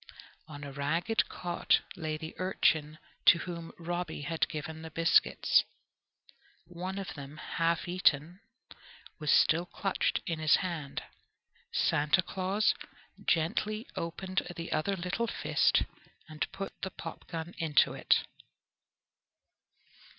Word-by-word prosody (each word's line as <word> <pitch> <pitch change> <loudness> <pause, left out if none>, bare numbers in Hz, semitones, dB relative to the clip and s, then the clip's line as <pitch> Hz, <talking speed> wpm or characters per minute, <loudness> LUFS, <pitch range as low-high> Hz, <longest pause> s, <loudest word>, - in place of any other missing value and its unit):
On 145 -1 -9
a 140 - -6
ragged 160 +10 0
cot 175 -1 +1
lay 155 -2 -3
the 160 +1 -7
urchin 160 -5 +2 0.3
to - - +9
whom 170 -1 -6
Robby 175 -1 -3
had 160 +3 0
given 155 +1 -5
the 160 - -7
biscuits. 165 +1 +4 1.0
One 180 +3 -5
of 195 -1 -4
them, 145 +1 -9
half 165 +1 0
eaten, 175 -1 +2 0.8
was 150 -2 +1
still 170 +2 +4
clutched 195 +2 0
in 165 -3 -2
his 155 -1 +5
hand. 165 -7 -3 0.7
Santa 150 +5 +3
Claus 190 +4 +1 0.5
gently 210 +7 +1
opened 185 +3 -2
the 165 0 -6
other 175 +6 +1
little 185 +6 -2
fist - - +2 0.4
and 155 -1 -3
put 195 0 -5
the 190 - -2
popgun 165 -1 -7
into 160 -4 +3
it. - - +3
165 Hz, 115 wpm, -31 LUFS, 155-185 Hz, 1.0 s, to